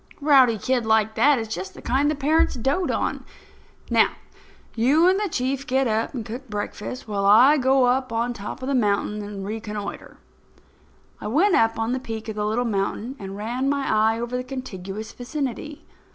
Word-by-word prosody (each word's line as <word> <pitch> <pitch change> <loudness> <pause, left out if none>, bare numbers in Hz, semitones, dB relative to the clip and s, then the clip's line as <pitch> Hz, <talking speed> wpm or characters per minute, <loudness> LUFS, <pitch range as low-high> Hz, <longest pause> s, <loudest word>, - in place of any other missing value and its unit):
"A 285 - -10
rowdy 260 -6 +6
kid 255 +3 0
like 220 -1 +2
that 285 +4 +4
is 225 -1 -3
just 190 -3 -6
the - - -11
kind 275 +4 +1
that 305 - -1
parents 305 +3 +2
dote 270 +9 0
on. - - -1 0.7
Now, - - +4 0.6
you 280 +9 +4
and 380 +2 +3
the 415 -2 -1
Chief 265 0 -2
get 265 +1 +2
up 225 +4 -1
and 230 -4 -4
cook 245 +3 -8
breakfast, 210 +4 -5
while 200 -2 -2
I 250 +9 +7
go 260 0 +3
up 255 +1 +1
on 230 +2 0
the 230 - -13
top 210 +5 -7
of - - -3
this 275 - 0
mountain 210 -2 0
and 205 -1 -6
reconnoitre." 210 -1 -6 1.0
I - - -6
went 340 - +3
up 225 -5 +3
on 225 +1 -1
the 260 - -1
peak 225 -3 -6
of 220 - -5
the 210 0 -1
little 235 +3 0
mountain 220 +4 -2
and 195 -1 -7
ran 245 +6 -2
my 280 -1 0 0.3
eye - - -5
over 240 +1 -4
the 250 - -2
contiguous 215 -5 -7
vicinity. 280 +2 -5
240 Hz, 195 wpm, -23 LUFS, 215-270 Hz, 1.0 s, I